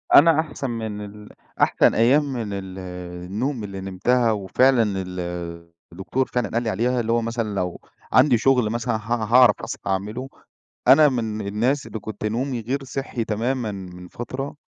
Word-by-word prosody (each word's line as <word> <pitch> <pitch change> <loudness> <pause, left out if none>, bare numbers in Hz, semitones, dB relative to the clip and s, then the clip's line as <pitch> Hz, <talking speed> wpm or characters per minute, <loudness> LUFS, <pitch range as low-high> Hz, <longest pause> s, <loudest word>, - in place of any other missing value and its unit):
أنا 160 +1 +7
أحسن 145 -4 -3
من 110 -3 -4
ال 105 +1 -12 0.3
أحسن - - +4
أيام 135 +5 +3
من 110 -5 -3
ال 95 -1 -6 0.5
النوم 115 +6 -2
اللي 95 -1 -6
نمتها 115 +6 +1
وفعلًا 115 +5 +3 0.2
ال 90 0 -6 0.7
الدكتور 95 +9 -2
فعلًا 125 - -1
قال 115 +1 -1
لي 110 - -1
عليها، 125 +3 0
اللي 115 -1 -1
هو 115 0 +2
مثلًا 115 -3 -3
لو 90 -2 -2 0.3
عندي 130 -1 +6
شغل 125 -2 +3
مثلًا 120 0 -1
ه 110 - -2 0.2
هاعرف 120 0 +5
أصحى - - -6
أعمله، 105 +7 -2 0.6
أنا 150 +2 +8
من 110 -5 -3
الناس 120 +8 0
اللي 110 - -6
كنت 105 0 -6
نومي 120 +3 -1
غير 135 +5 -3
صحّي 135 -2 -4
تمامًا 115 +2 -1
من 90 -2 -9
فترة، 130 +8 -6
115 Hz, 165 wpm, -23 LUFS, 105-130 Hz, 0.7 s, أنا